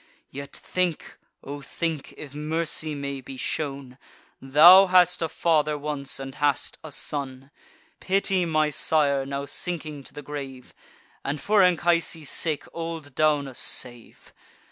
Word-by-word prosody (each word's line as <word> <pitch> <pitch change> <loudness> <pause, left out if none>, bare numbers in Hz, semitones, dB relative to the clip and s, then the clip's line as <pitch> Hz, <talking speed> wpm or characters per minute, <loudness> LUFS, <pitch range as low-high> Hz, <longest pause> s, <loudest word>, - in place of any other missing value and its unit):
Yet 140 +1 -8
think, 180 -3 -3 0.2
O 145 +1 -7
think, 160 0 -4
if 145 -2 -10
mercy 155 0 +1
may 140 -1 -5
be 130 +1 -10
shown, 135 -2 -4 0.4
Thou 170 +8 +8
hadst 180 -1 +4
a 165 - -1
father 155 -2 +1
once, 145 -2 -3
and 135 0 -7
hast 145 -2 -1
a 155 - -9
son. 135 -1 -4 0.5
Pity 195 -1 +1
my 155 -2 +1
sire, 140 -2 +1
now 140 0 -4
sinking 155 -1 -4
to - - -10
the 145 - -8
grave; 135 -3 -8 0.5
And 145 +2 -3
for 205 +7 +3
Anchises' 170 -4 +2
sake 155 -3 0
old 165 -4 -6
Daunus 145 -3 +1
save! 120 -2 -3
150 Hz, 135 wpm, -25 LUFS, 140-165 Hz, 0.5 s, Thou